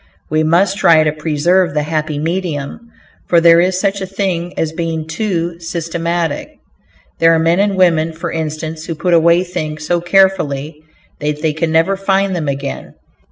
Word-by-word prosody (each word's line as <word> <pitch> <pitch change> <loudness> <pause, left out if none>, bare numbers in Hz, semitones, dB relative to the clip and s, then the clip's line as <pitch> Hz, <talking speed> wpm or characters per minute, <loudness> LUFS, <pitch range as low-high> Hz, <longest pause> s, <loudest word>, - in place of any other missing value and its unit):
We 155 0 +2
must 180 +5 +2
try 165 -4 +5
to 155 - +1
preserve 160 +2 +1
the 150 - +1
happy 155 -1 -2
medium, 165 +5 -4 0.4
for 170 - +4
there 165 0 +6
is 180 +1 +1
such 200 0 -1
a 190 - -3
thing 185 -3 -2
as 160 -1 -1
being 165 -2 -3
too 170 -1 -2
systematic. 170 -1 -3 0.6
There 165 0 +5
are - - +2
men 165 +3 +2
and 200 0 +1
women, 165 -3 +3
for 165 +1 -5
instance, 155 0 -5
who 165 - -3
put 175 +3 0
away 170 +1 +4
things 155 -4 -5
so 175 +1 0
carefully 165 -6 +1 0.4
that 150 +1 -3
they 155 -1 +1
can 160 +1 -2
never 165 +5 +2
find 195 0 0
them 160 -4 -3
again. 140 0 -5
165 Hz, 170 wpm, -16 LUFS, 155-180 Hz, 0.6 s, there